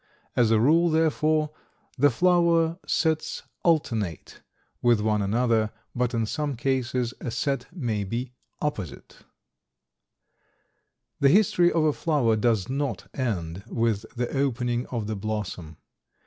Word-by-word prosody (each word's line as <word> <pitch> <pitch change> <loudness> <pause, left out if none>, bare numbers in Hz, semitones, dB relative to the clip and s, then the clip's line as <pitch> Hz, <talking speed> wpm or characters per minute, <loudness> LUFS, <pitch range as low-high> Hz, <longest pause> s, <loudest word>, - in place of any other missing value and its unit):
As 120 -3 +4
a 110 -1 +4
rule, 165 +8 +4
therefore, 155 -1 +2 0.4
the 145 +2 +4
flower 170 +2 +3
sets 160 -1 0 0.2
alternate 115 - -1 0.4
with 120 -2 +4
one 105 0 +1
another, 110 +1 +1 0.2
but 125 0 -1
in 115 -1 +1
some 145 +4 -2
cases 125 -1 -1
a - - -3
set 135 +4 -2
may 115 - -2
be 120 +6 -4 0.3
opposite. 105 - -4 2.0
The 140 - +5
history 175 -1 +4
of 165 - +2
a 155 -1 +3
flower 140 -10 +1
does 110 -3 +1
not 140 +2 -3
end 95 -8 -3
with 115 -3 0
the 120 +3 -2
opening 125 -3 0
of 115 -4 -3
the 110 +1 -3
blossom. 100 -7 -5
125 Hz, 125 wpm, -26 LUFS, 110-150 Hz, 2.0 s, The